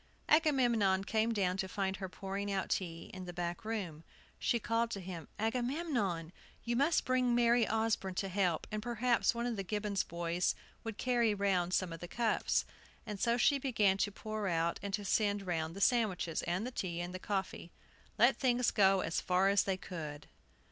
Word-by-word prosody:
Agamemnon 240 - +3
came 220 +3 +1
down 190 -4 0
to 190 - -1
find 190 0 -2
her 190 -2 -5
pouring 195 +2 -4
out 195 -1 -1
tea, 165 -3 -3
in 185 -1 -7
the 175 - -6
back 175 0 -4
room. 190 -8 -4 0.4
She 235 - +2
called 230 +1 0
to 205 - -4
him: 175 -4 -7
"Agamemnon, 240 - -1 0.3
you 240 0 -1
must 285 +6 +2
bring 255 -1 +2
Mary 235 -1 +4
Osborne 220 -4 0
to 195 - -1
help, 185 -4 0
and 215 0 -2
perhaps 240 +1 +1
one 235 +1 -2
of 240 -3 -2
the 195 - -2
Gibbons 205 0 -1
boys 170 +1 -1 0.3
would 225 -2 -5
carry 235 -4 +2
round 185 -3 +1
some 180 -3 0
of 165 - -7
the 175 - -7
cups." 230 +3 +1 0.4
And 210 -3 -5
so 235 +3 +2
she 280 +3 +4
began 215 -8 +2
to 205 +1 0
pour 215 0 -4
out 170 -1 0
and 200 0 -4
to 205 -1 -7
send 205 0 +1
round 165 -2 -2
the - - -6
sandwiches, 200 -8 +2
and 180 +6 0
the 250 - -4
tea, 175 -7 -3
and 175 +1 -4
the 185 - -5
coffee. 190 -3 -3 0.5
Let 240 +4 +5
things 250 -2 +2
go 195 -1 +4
as 165 - -1
far 185 +2 +3
as 200 0 +3
they 190 -1 -1
would! 150 -4 -6
200 Hz, 190 wpm, -34 LUFS, 180-235 Hz, 0.5 s, Let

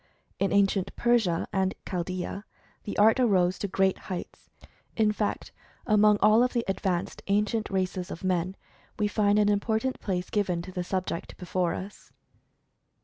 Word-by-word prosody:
In 195 - +1
ancient 195 -1 +2
Persia 230 -8 +2
and 190 -1 0
Chaldea, 185 +2 -4 0.4
the 205 - -5
art 220 +4 +5
arose 185 -7 +3
to 200 - -2
great 190 0 +1
heights. 185 -2 -7 0.5
In 215 -2 +3
fact, 210 0 -3 0.3
among 210 -2 +5
all 215 +2 +6
of 250 0 +2
the 235 -2 0
advanced 190 -2 -2
ancient 210 +2 +1
races 185 -1 -2
of 170 - -7
men, 185 0 0 0.4
we 210 - +1
find 205 0 +2
an 210 -1 +4
important 220 +5 0
place 180 -3 -3
given 180 -5 0
to 185 - -9
the 180 -1 -3
subject 185 -2 -4
before 180 -1 -1
us. 195 +2 -9
195 Hz, 150 wpm, -27 LUFS, 185-210 Hz, 0.5 s, all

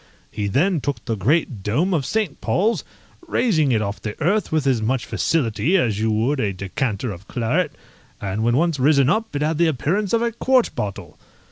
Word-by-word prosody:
He 105 -1 -3
then 160 - +1
took 145 +1 -3
the 115 - -1
great 120 - 0
dome 150 - 0
of 145 -6 0
St. 220 -1 -2
Paul's, 220 +5 +1 0.4
raising 170 - +2
it 110 -3 +2
off 100 +1 -4
the 105 -1 -6
earth 195 +7 +1
with 155 -3 +1
as 130 -5 +2
much 125 +3 0
facility 125 - +1
as 110 - 0
you 110 +1 +1
would 115 +7 +1
a 105 -5 0
decanter 100 +4 -3
of 95 +2 -10
claret. 140 +8 0 0.5
And 100 -1 -3
when 120 +2 +2
once 165 -2 +1
risen 140 0 +4
up 220 -2 -1
it 145 - 0
had 155 +1 0
the 170 - +4
appearance 175 - 0
of 230 0 +2
a 235 - 0
quart 255 +2 +2
bottle. 100 -2 -5
140 Hz, 200 wpm, -22 LUFS, 110-170 Hz, 0.5 s, risen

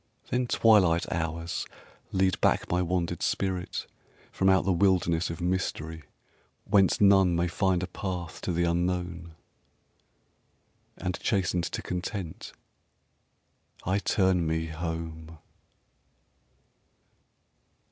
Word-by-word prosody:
Then 125 0 +1
twilight 95 -8 +4
hours 85 0 -3 0.4
lead 95 0 +1
back - - +2
my 90 +1 +2
wandered 85 -1 -1
spirit 95 -2 -2 0.5
From 95 - +2
out 95 -1 +4
the 95 - +2
wilderness 90 -2 +2
of 85 - -5
mystery 85 -3 -2 0.6
Whence 95 -2 +3
none 95 -3 +5
may 85 +1 +1
find 90 +1 +1
a - - -3
path 90 -2 -5
to - - -2
the 85 0 +1
Unknown, 85 -1 -1 1.6
And 90 0 -3
chastened 90 -4 0
to - - -4
content 90 -1 -5 1.3
I 95 +3 +1
turn 95 -4 +2
me 80 0 0
home. 80 0 -6
90 Hz, 105 wpm, -28 LUFS, 85-95 Hz, 1.6 s, none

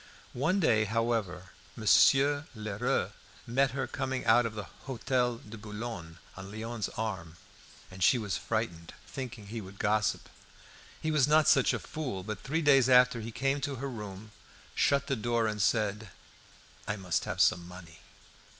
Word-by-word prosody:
One 160 +10 +1
day, 110 - +3
however, 110 -6 -1 0.2
Monsieur 140 +6 +4
Lheureux 105 -2 -1 0.3
met 135 +3 +2
her 135 0 -2
coming 130 +1 -3
out 120 +1 +5
of 110 - -8
the 105 - -4
Hotel 125 +3 -2
de 110 0 -11
Boulogne 105 -6 -7 0.2
on 95 +1 -9
Léon's 110 0 -4
arm; 95 -7 -4 0.6
and 95 -1 -4
she 125 - +5
was 105 -6 -2
frightened, 85 -1 -3
thinking 125 -5 -7
he 115 0 -5
would 95 0 -11
gossip. 105 0 0 0.7
He 160 - -1
was 150 -3 +3
not 155 +1 +4
such - - +5
a - - 0
fool. 130 -12 -5
But 105 0 -5
three 160 +4 -1
days 135 -3 +5
after 125 -2 +5
he 115 +1 -6
came 135 +4 0
to 140 +1 -2
her 135 +2 -4
room, 105 -2 -8 0.4
shut 140 -1 +2
the 135 - -1
door, 120 0 0
and 105 -1 -1
said, 105 0 0 0.8
"I 105 - -1
must 95 -4 -1
have - - -4
some 85 0 +3
money." 90 -2 -12
115 Hz, 160 wpm, -30 LUFS, 105-130 Hz, 0.8 s, out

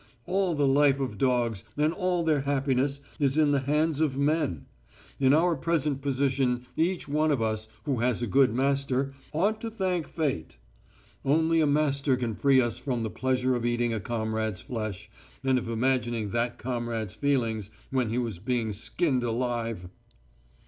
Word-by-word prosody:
All 190 -2 +1
the 145 -1 +2
life 140 0 +4
of 125 -7 -3
dogs, 120 -6 +1
and 150 +2 +2
all 180 -3 0
their 155 -3 +2
happiness, 140 0 0 0.2
is 140 0 +2
in 150 -2 +4
the 140 - +3
hands 150 +3 +1
of 140 -4 +1
men. 145 - 0 0.5
In 135 -1 +4
our 165 +3 +4
present 150 -2 0
position 130 -2 0
each 175 +3 0
one 155 +2 +1
of 145 -4 +2
us, 110 -1 -1 0.2
who 135 -5 -1
has 120 0 +1
a - - +2
good 130 +2 +4
master, 135 +1 0 0.2
ought 205 +8 0
to 230 - -3
thank 185 -6 -1
Fate. 135 - -3 0.7
Only 160 +3 +3
a 155 - +3
master 140 -2 +2
can 120 -3 -2
free 135 +4 +4
us 120 -2 0
from 125 -5 -2
the 110 - -3
pleasure 130 0 0
of 120 -2 -1
eating 120 0 +1
a 110 - -1
comrade's 110 -2 -2
flesh, 110 -5 -5 0.4
and 130 -1 +3
of 115 - -6
imagining 120 -3 0
that 120 +2 -1
comrade's 115 -4 -3
feelings 115 -5 0 0.2
when 130 -4 +1
he 115 - -1
was 115 -8 -2
being 115 0 -1
skinned 130 - 0
alive." 115 -5 -2
130 Hz, 170 wpm, -27 LUFS, 120-145 Hz, 0.7 s, life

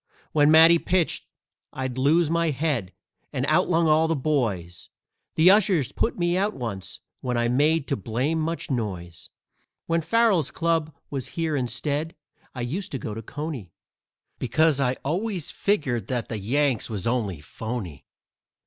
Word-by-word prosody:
When 150 -1 +4
Matty 165 +2 +8
pitched 180 -1 0 0.4
I'd 130 -2 -4
lose 155 +5 +4
my 170 +1 +1
head 135 - -1 0.4
and - - -1
outlung 165 0 +3
all 155 +1 +4
the 165 - +1
boys 110 - -2 0.5
The 170 +4 +7
ushers 190 - +3
put 230 - -1
me 175 -1 +1
out 200 +3 0
once, 100 -6 -6 0.2
when 125 -2 -2
I 120 0 +2
made 145 +4 +2
too 140 - -1
blame 125 - -1
much 165 -1 -3
noise. 95 -9 -4 0.6
When 165 0 +1
Farrell's 220 -3 +2
club 165 -2 0 0.2
was 135 -3 -3
here 160 -2 0
instead, 145 +5 -2 0.4
I 125 - -4
used 165 +11 -4
to - - -1
go 105 -3 -5
to 110 - -6
Coney, 130 - -6 0.7
Because 155 +4 +2
I 130 -2 +2
always 180 +2 -2
figgered 130 - 0
that 125 -3 -3
the 110 - -3
Yanks 130 +4 0
was 100 -4 -4
only 115 -8 -1
phony. 95 - -6
145 Hz, 150 wpm, -25 LUFS, 120-165 Hz, 0.7 s, Matty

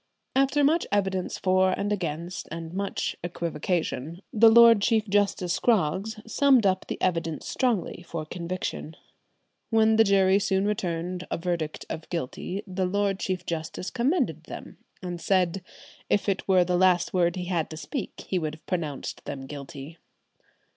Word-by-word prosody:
After 275 +2 +3
much 315 +4 +3
evidence 190 -2 0
for 185 0 +3
and 205 +1 0
against, 170 -1 -4
and 165 0 -6
much 200 +1 -2
equivocation, 170 -1 -3
the 225 +1 +7
Lord 230 -1 +8
Chief 220 0 +2
Justice 195 -3 +1
Scroggs 215 0 +1
summed 260 0 +4
up 185 -1 +1
the - - -4
evidence 165 -3 -1
strongly 235 -9 -1
for 170 -2 -5
conviction. 170 -1 -5 0.7
When 220 -1 +4
the 225 - +7
jury 195 -1 +4
soon 195 -1 +1
returned 180 -3 -2
a - - -1
verdict 165 -3 -3
of 160 - -6
guilty, 175 +4 -4
the 185 -1 -1
Lord 200 0 0
Chief 185 -1 -2
Justice 165 +2 -4
commended 260 +9 0
them, - - -9 0.2
and 175 -1 -5
said 185 -1 +1 0.5
if 205 - +1
it 195 -1 -1
were 185 -2 +5
the 180 0 +1
last 185 -2 +3
word 175 -1 +2
he 180 -1 -4
had 175 -3 -1
to 155 - -8
speak 230 - -5
he 185 - 0
would 155 -2 -3
have 155 - -22
pronounced 160 -6 -4
them 135 -1 -6
guilty. 140 +3 -9
185 Hz, 155 wpm, -26 LUFS, 170-205 Hz, 0.7 s, Lord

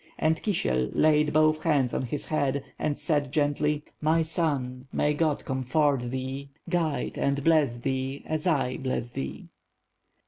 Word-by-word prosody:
And 160 0 +1
Kisiel 65 - 0
laid 150 -1 +4
both 155 0 +3
hands 140 -7 +2
on - - 0
his 130 +3 -4
head, 140 -3 0 0.2
and 145 - -1
said, 145 -5 0
gently: 150 0 +1 0.2
"My 160 +2 +3
son, 140 -6 -1
may 150 - +1
God 150 -1 0
comfort 130 -1 +1
thee, 130 +2 -4 0.2
guide 170 -4 -1
and 140 0 0
bless 155 -6 +3
thee, 130 +2 -3
as 155 +2 -2
I 135 -6 +1
bless 130 -2 -3
thee." 65 - -6
145 Hz, 145 wpm, -27 LUFS, 130-155 Hz, 0.2 s, laid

